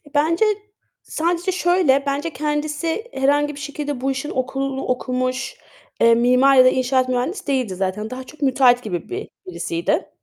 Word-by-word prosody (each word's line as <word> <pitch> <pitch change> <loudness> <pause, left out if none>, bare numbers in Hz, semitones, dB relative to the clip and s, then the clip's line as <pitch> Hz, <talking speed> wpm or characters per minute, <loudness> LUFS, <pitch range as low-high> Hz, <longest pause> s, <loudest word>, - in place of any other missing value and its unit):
Bence 335 +7 +3 0.6
sadece 345 +3 -1
şöyle, 350 -6 +2
bence 280 +4 -1
kendisi 300 - -2
herhangi 290 +2 +1
bir 285 - -9
şekilde 290 -2 -5
bu 270 +1 0
işin 275 +2 -4
okulu 270 +1 -3
okumuş, 255 - -2 0.4
eee, 230 0 +6
mimar 250 +3 +4
ya 255 -1 +7
da - - +8
inşaat 255 0 +1
mühendisi 255 - -2
değildi 255 -9 0
zaten. 195 +3 -3
Daha 255 +1 -6
çok 305 +4 -16
müteahhit 255 -3 +4
gibi 180 -5 -5
bir 385 +3 -5 0.2
birisiydi. 300 - -2
270 Hz, 155 wpm, -21 LUFS, 255-300 Hz, 0.6 s, da